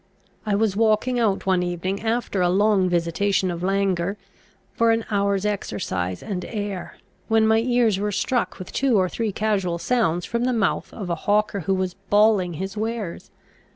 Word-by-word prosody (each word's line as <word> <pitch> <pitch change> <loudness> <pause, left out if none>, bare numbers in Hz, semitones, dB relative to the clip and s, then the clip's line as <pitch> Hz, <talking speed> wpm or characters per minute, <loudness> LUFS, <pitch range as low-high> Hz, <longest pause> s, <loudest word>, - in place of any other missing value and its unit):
I 205 - +2
was 210 -1 +1
walking 225 +3 +2
out 210 -4 +1
one 185 -2 +2
evening, 180 +2 -2
after 225 -3 -1
a 175 - +3
long 195 0 +3
visitation 180 +2 +1
of 170 0 -5
languor, 195 0 0 0.6
for 230 0 +2
an 225 0 +2
hour's 200 -1 +1
exercise 95 - -3
and 185 -3 -4
air, 205 -4 -5 0.3
when 220 0 +3
my 220 0 +4
ears 235 -4 +2
were 210 +1 -1
struck 245 +5 -1
with 185 - -8
two 260 -5 +2
or 185 -1 +3
three 220 +3 -2
casual 195 -4 0
sounds 175 -5 0
from 235 +1 -1
the 255 - +1
mouth 220 -5 0
of 190 -5 -5
a - - +1
hawker 210 0 +2
who 190 +2 0
was 185 -1 -2 0.2
bawling 205 -4 +4
his 190 +5 -5
wares. 220 -4 -4
200 Hz, 175 wpm, -23 LUFS, 185-220 Hz, 0.6 s, my